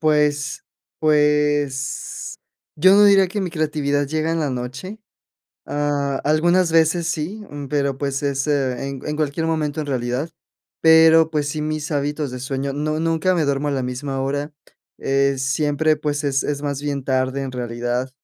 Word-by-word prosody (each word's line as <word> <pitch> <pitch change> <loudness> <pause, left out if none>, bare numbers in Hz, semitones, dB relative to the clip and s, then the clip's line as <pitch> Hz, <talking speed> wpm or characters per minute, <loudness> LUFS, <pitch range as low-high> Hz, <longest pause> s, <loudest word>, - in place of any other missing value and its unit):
pues 150 -2 +1 0.3
pues 150 -3 0 0.4
yo 185 +5 +6
no 205 +1 +7
diría 195 -1 +6
que 205 +2 -3
mi 185 - -2
creatividad 145 -3 0
llega 155 +2 -1
en 165 - 0
la 145 - 0
noche. 130 - -6 0.7
Ah, 145 -2 -1
algunas 170 +4 +3
veces 165 +1 +3
sí, 170 +7 -3
mm, 145 -1 -6
pero, 140 -2 0
pues, 140 0 -2
es 140 0 -1
eh, 135 -3 0
en 135 -1 -6
en 150 0 -2
cualquier 155 +1 -1
momento 155 -2 -1
en 150 - -4
realidad. 130 +3 -2 0.5
Pero, 160 0 +6
pues, 150 -2 -1
sí, 150 +1 -3
mis 155 0 -3
hábitos 145 0 -1
de 125 0 -7
sueño 135 +1 -3
no 155 +2 -2
nunca 165 +3 +1
me 165 - +1
duermo 140 +1 0
a - - 0
la 135 - -1
misma 135 +2 -3
hora. 145 +2 -2 0.5
Eh, 135 0 +1
siempre, 145 +3 +1
pues 150 -1 -2
es 135 -1 +1
es 145 0 -2
más 140 -1 -3
bien 140 -2 -3
tarde 130 +1 0
en 130 -1 -5
realidad, 120 +1 -3
145 Hz, 170 wpm, -21 LUFS, 135-155 Hz, 0.7 s, no